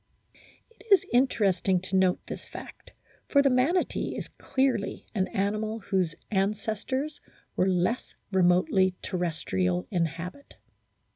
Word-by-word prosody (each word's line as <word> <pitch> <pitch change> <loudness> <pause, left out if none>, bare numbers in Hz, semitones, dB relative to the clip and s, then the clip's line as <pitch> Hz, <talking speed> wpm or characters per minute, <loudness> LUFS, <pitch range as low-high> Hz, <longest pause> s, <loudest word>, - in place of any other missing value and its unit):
It 425 - -18
is 395 0 +6
interesting 200 -7 +3
to 185 +1 -4
note 185 -1 +2
this - - -7
fact, - - -11 0.4
for 280 -1 +4
the 275 - +4
Manatee 275 +9 +1
is - - -5
clearly 260 -6 -1
an 190 -4 +1
animal 215 +3 -1
whose 185 -5 0 0.2
ancestors 215 +8 -1 0.3
were 190 - +2
less 185 +6 0 0.2
re 190 -1 +3
motely 185 +1 +3
terrestrial 95 - -1
in 170 -2 +2
habit. 180 - -9
195 Hz, 125 wpm, -28 LUFS, 180-250 Hz, 0.4 s, is